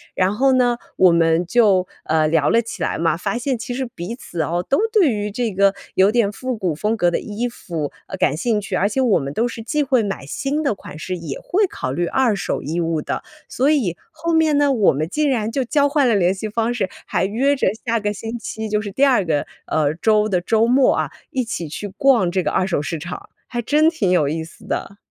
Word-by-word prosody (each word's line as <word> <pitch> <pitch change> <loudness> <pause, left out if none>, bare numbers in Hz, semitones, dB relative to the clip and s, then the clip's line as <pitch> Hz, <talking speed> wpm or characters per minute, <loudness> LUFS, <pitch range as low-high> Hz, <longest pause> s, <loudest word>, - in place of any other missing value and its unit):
然 185 +1 +2
后 265 +5 +3
呢， 245 -2 +3 0.2
我 185 -1 +6
们 165 +1 +3
就， 195 -2 +3 0.2
呃， 155 0 +2
聊 155 -2 +2
了 230 - +4
起 230 - -8
来 - - -1
嘛， 165 0 +1
发 180 - -2
现 255 +1 -1
其 235 +2 -5
实 265 +1 -2
彼 225 -2 -6
此 175 -8 -5
哦， 170 +3 -1
都 275 - +2
对 405 -9 +4
于 210 -1 -2
这 230 0 -2
个 195 +1 +3 0.2
有 190 +2 +5
点 225 -3 +2
复 255 +3 -4
古 185 -6 -1
风 215 +9 -1
格 175 -4 +2
的 - - 0
衣 220 +3 -3
服， 165 -10 -5 0.2
呃， - - -6
感 140 - +2
兴 215 +6 0
趣， 205 - -4
而 200 - +2
且 240 - -2
我 240 -6 +3
们 140 -1 -4
都 230 +9 +1
是 235 -1 -7
既 295 +7 0
会 255 -3 +2
买 195 -8 -4
新 280 - -2
的 275 - +1
款 175 - -11
式， 185 +3 -4
也 165 -6 -6
会 405 +3 +1
考 130 - -4
虑 170 +6 -1
二 250 -2 +2
手 195 - -2
衣 160 +4 -2
物 165 -2 0
的。 - - -3 0.2
所 265 +3 +1
以， 245 - +1 0.2
后 335 +1 -3
面 315 -2 +3
呢， 290 -1 +3
我 220 -7 +3
们 150 +3 -2
竟 295 - 0
然 225 -4 0
就 265 +2 0
交 285 +3 +2
换 285 -2 +2
了 225 - +3
联 185 -2 +3
系 205 +3 -5
方 230 +2 0
式， 200 -6 -1 0.2
还 185 - 0
约 255 +8 +1
着 265 - 0 0.2
下 230 -1 +1
个 205 -1 -1
星 225 +3 -6
期 220 -1 -5
就 210 0 0
是 205 -1 -6
第 270 +8 +3
2 255 -7 +3
个， 155 -4 0 0.2
呃， 150 -2 +1
周 215 +4 +2
的 185 -4 0
周 220 +5 +2
末 255 +3 +4
啊， - - -1 0.2
一 260 - -1
起 175 -8 -4
去 205 +7 -5
逛 205 -2 +2
这 185 +1 +1
个 - - -1
二 185 - +1
手 185 -6 0
市 160 +3 -3
场， 180 +4 -8 0.2
还 240 -1 -3
真 300 +6 +3
挺 225 - 0
有 175 -5 +3
意 160 +3 -2
思 160 - -14
的。 200 - -4
210 Hz, 265 characters per minute, -20 LUFS, 175-250 Hz, 0.2 s, 我